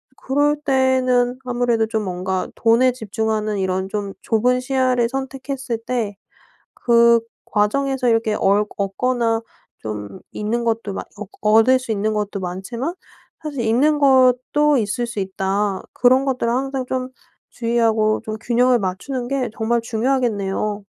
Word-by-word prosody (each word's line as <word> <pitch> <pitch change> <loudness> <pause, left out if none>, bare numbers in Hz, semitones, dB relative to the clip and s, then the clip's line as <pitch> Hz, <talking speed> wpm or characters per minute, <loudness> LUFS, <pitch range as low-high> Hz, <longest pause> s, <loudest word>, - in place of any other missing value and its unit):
그럴 290 +3 +1
때에는 255 -2 +2
아무래도 240 -3 0
좀 220 -1 -2
뭔가 185 0 -2
돈에 235 +3 +4
집중하는 220 -2 -2
이런 190 0 -1
좀 200 -1 -4
좁은 245 +3 +2
시야를 255 -2 +1
선택했을 265 -1 -4
때 230 -5 -2 0.7
그 235 -1 +5 0.3
과정에서 255 +5 +1
이렇게 225 -1 +2
얼 205 +1 +2
얻거나 225 +3 0 0.4
좀 105 -2 -7
잃는 225 +3 -2
것도 225 -3 -1
많 - - -4 0.2
얻 210 - -6
얻을 225 +4 +5
수 255 -3 -5
있는 215 0 0
것도 210 -1 -2
많지만 195 - -4 0.5
사실 290 -5 -4
잃는 260 +7 +2
것도 270 +2 +4
있을 235 +2 -1
수 230 -3 -5
있다. 195 +1 -1
그런 255 +2 +4
것들을 255 -3 0
항상 265 +1 -2
좀 255 0 -2 0.4
주의하고 225 -2 +1
좀 215 -1 -4
균형을 245 +1 +3
맞추는 235 +7 -3
게 265 -2 -1
정말 235 +1 +1
중요하겠네요. 220 -4 -1
235 Hz, 285 characters per minute, -20 LUFS, 210-255 Hz, 0.7 s, 그